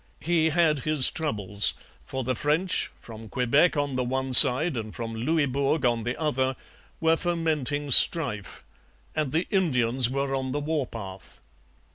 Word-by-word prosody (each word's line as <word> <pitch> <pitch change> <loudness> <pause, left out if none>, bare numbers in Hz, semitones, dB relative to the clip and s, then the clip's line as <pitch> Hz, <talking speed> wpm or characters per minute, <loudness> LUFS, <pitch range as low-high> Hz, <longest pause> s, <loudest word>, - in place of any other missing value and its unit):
He 165 -1 -1
had 160 -2 -1
his 150 -1 +4
troubles; 105 -10 0 0.3
for 130 -1 -7
the 130 +1 -3
French, 155 +8 -2
from 110 -1 -14
Quebec 140 +8 -1
on 145 -2 -4
the 125 - -2
one 130 +1 -5
side 135 +6 +8
and 110 -2 -8
from 115 -1 -7
Louisbourg 140 +3 -3
on 120 -2 -1
the 120 +3 -6
other, 130 -4 -3 0.4
were 160 0 0
fomenting 155 -5 -4
strife; 125 - +4 0.5
and 150 -4 -4
the 165 +3 -2
Indians 130 - -1
were 140 +1 -4
on 130 -1 -5
the 145 - -4
war 150 -2 -4
path. 95 -4 -12
135 Hz, 150 wpm, -23 LUFS, 125-155 Hz, 0.5 s, side